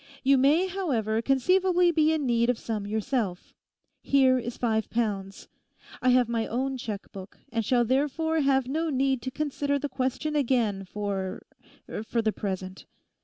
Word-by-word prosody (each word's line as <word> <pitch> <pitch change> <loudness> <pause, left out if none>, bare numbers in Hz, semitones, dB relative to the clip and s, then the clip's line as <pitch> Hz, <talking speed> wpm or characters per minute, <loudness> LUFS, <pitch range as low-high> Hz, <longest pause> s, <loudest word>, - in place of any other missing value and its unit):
You 275 +1 +5
may, 285 +7 +4
however, 255 - -1
conceivably 360 +7 +3
be 315 -1 +3
in 310 -3 0
need 235 -1 +2
of 245 - +2
some 215 -3 -4
yourself; 215 -3 -2 0.5
here 260 -2 +4
is 240 0 -6
five 220 -2 0
pounds. 200 -4 -3 0.5
I 255 - +3
have 250 -1 +4
my 230 -1 -1
own 265 +3 -2
cheque 215 -5 -6
book, 190 0 -10
and 230 -1 -1
shall 240 +2 +2
therefore 295 +6 0
have 270 -3 +2
no 320 +4 -1
need 270 -2 +1
to 260 - -4
consider 285 0 -1
the 290 +1 -3
question 265 +4 -2
again 235 -8 +1
for—for 205 +3 -5
the 220 - +2
present. 190 -2 -5
255 Hz, 155 wpm, -27 LUFS, 220-280 Hz, 0.5 s, You